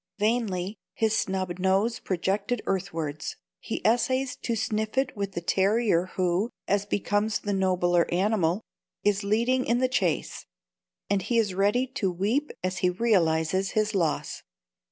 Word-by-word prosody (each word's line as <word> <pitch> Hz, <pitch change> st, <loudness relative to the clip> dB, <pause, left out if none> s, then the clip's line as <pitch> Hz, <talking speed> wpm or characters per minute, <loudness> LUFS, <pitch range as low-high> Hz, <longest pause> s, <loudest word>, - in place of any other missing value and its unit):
Vainly, 210 Hz, -3 st, 0 dB, 0.2 s
his 220 Hz, -1 st, +1 dB
snub 185 Hz, -3 st, -1 dB
nose 195 Hz, +5 st, +2 dB
projected 200 Hz, +5 st, -1 dB
earthwards, 165 Hz, -6 st, -3 dB, 0.2 s
he -, -, -5 dB
essays 255 Hz, +3 st, +2 dB
to 235 Hz, -, -2 dB
sniff 220 Hz, +2 st, -2 dB
it 265 Hz, -1 st, +1 dB
with 200 Hz, -2 st, -3 dB
the 170 Hz, -, -3 dB
terrier 195 Hz, 0 st, +2 dB
who 185 Hz, +4 st, +1 dB, 0.2 s
(as 200 Hz, 0 st, +1 dB
becomes 205 Hz, +1 st, 0 dB
the 205 Hz, -, -2 dB
nobler 180 Hz, -2 st, +2 dB
animal) 185 Hz, 0 st, +1 dB, 0.4 s
is 205 Hz, 0 st, +2 dB
leading 235 Hz, +5 st, +2 dB
in 235 Hz, -, +1 dB
the 255 Hz, +1 st, +2 dB
chase; 185 Hz, -10 st, -1 dB, 0.6 s
and 200 Hz, -1 st, +1 dB
he 235 Hz, +5 st, 0 dB
is 210 Hz, -4 st, +2 dB
ready 205 Hz, +7 st, +2 dB
to 255 Hz, -7 st, -2 dB
weep 215 Hz, +12 st, 0 dB
as 185 Hz, 0 st, -1 dB
he 180 Hz, -, +3 dB
realises 180 Hz, -3 st, +1 dB
his 215 Hz, 0 st, +2 dB
loss. 165 Hz, -6 st, -1 dB
200 Hz, 145 wpm, -27 LUFS, 185-225 Hz, 0.6 s, he